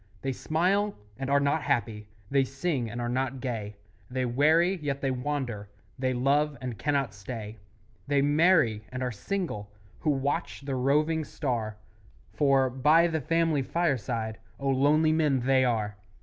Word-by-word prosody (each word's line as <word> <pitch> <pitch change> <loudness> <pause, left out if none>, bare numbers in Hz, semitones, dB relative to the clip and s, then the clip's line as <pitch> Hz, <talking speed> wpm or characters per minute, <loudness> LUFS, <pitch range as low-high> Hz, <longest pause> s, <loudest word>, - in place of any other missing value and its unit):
They 135 - 0
smile 185 +9 0 0.2
and 135 0 -3
are 140 0 +4
not 140 +3 +1
happy; 115 -7 -1 0.2
They 135 -1 +4
sing 135 -2 -2
and 120 +2 -6
are 120 - -2
not 130 +1 -1
gay; 110 -5 -4 0.3
They 130 0 -1
weary, 160 +9 +3
yet 145 -4 -3
they 135 -1 0
wander; 125 -6 -3 0.3
They 130 0 +1
love, 140 +3 +1
and 125 -2 -5
cannot 140 -7 0
stay; 105 +2 -7 0.5
They 145 0 +2
marry, 145 - +3
and 130 0 -3
are 125 - -1
single 110 - -4 0.3
Who 155 - -1
watch 145 +4 -1
the 140 -1 -4
roving 150 +5 +2
star, 115 -8 -3 0.6
For, 135 -2 +3
by 150 +6 +4
the 160 -2 0
family 165 0 +1
fireside, 125 -8 -1 0.2
Oh, 140 0 -1
lonely 145 +4 +3
men 150 -5 +2
they 130 +1 +3
are! 110 -4 0
135 Hz, 155 wpm, -28 LUFS, 120-150 Hz, 0.6 s, are